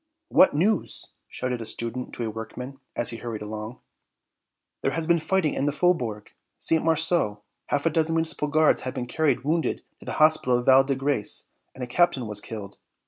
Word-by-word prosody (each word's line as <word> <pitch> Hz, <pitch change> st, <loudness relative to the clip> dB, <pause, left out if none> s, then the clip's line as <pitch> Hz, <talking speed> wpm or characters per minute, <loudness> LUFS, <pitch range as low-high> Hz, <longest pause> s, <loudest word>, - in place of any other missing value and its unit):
"What 185 Hz, -, +5 dB
news?" 190 Hz, +5 st, +1 dB, 0.2 s
shouted 125 Hz, -2 st, -4 dB
a -, -, -5 dB
student 115 Hz, +3 st, -4 dB
to 120 Hz, -, -4 dB
a -, -, -2 dB
workman, 125 Hz, +5 st, -7 dB, 0.2 s
as 120 Hz, 0 st, +1 dB
he 115 Hz, -, -5 dB
hurried 115 Hz, -2 st, -5 dB
along. 110 Hz, +3 st, -7 dB, 1.0 s
"There -, -, 0 dB
has 165 Hz, -1 st, 0 dB
been 170 Hz, 0 st, +3 dB
fighting 170 Hz, -1 st, +1 dB
in 140 Hz, -, -1 dB
the 145 Hz, -, +2 dB
Faubourg 135 Hz, -11 st, 0 dB, 0.3 s
St. 160 Hz, -, +2 dB
Marceau; 160 Hz, -10 st, +2 dB, 0.2 s
half 145 Hz, +1 st, 0 dB
a 165 Hz, -, +3 dB
dozen 160 Hz, +1 st, +1 dB
Municipal 160 Hz, -2 st, -1 dB
Guards 155 Hz, +1 st, +3 dB
have 130 Hz, +1 st, -5 dB
been 125 Hz, -2 st, -3 dB
carried 145 Hz, +1 st, 0 dB
wounded 160 Hz, +3 st, 0 dB, 0.2 s
to -, -, -14 dB
the -, -, -3 dB
hospital 155 Hz, -5 st, +4 dB
of 120 Hz, -, -4 dB
Val 135 Hz, 0 st, +7 dB
de 135 Hz, 0 st, -1 dB
Grace 135 Hz, -5 st, -1 dB, 0.3 s
and 130 Hz, -, -6 dB
a -, -, -4 dB
captain 130 Hz, -1 st, +2 dB
was 105 Hz, -1 st, -3 dB
killed." 105 Hz, -3 st, -8 dB
135 Hz, 195 wpm, -25 LUFS, 115-160 Hz, 1.0 s, Val